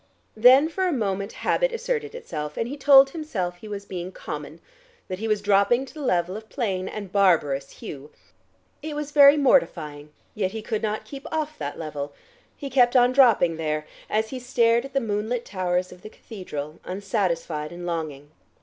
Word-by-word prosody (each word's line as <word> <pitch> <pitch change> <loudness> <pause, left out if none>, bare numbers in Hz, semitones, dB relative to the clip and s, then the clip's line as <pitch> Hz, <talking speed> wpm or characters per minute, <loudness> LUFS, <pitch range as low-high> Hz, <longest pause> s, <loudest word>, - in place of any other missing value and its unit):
Then 255 +7 +7
for 370 +3 -1
a - - +1
moment 200 - -2
habit - - +2
asserted 460 -1 -3
itself, 150 - -6
and 230 - -1
he 275 - -5
told 275 -1 +7
himself 205 - -4
he 215 - -11
was 205 -1 -6
being 180 -1 -6
common, - - -7 0.5
that 185 0 -5
he 225 - -3
was 210 -2 0
dropping 205 +6 +3
to - - -14
the 310 - -8
level 180 -7 0
of 220 +1 -9
plain 195 -8 -2
and 200 -3 -7
barbarous 155 -9 +2
Hugh. 145 +1 -9 0.7
It 305 0 -5
was 295 -1 -4
very 285 0 +8
mortifying, 155 - +1 0.2
yet 195 -2 -2
he 220 -1 -5
could 220 -2 -2
not 215 0 -2
keep 275 -1 -9
off 310 -1 -2
that 145 -1 -4
level. 145 -3 -5 0.4
He 280 - -6
kept 250 -2 +3
on 245 0 +6
dropping 230 -11 +4
there, 155 -1 -2 0.2
as 220 +1 0
he 260 - -4
stared 235 -1 +2
at 275 - -10
the 275 - +2
moonlit 220 +2 -2
towers 180 -1 -1
of 180 - -13
the 215 - -9
cathedral, 160 -10 -8
unsatisfied 180 -6 -2
and 175 0 -8
longing. 155 -4 -4
210 Hz, 185 wpm, -24 LUFS, 175-265 Hz, 0.7 s, very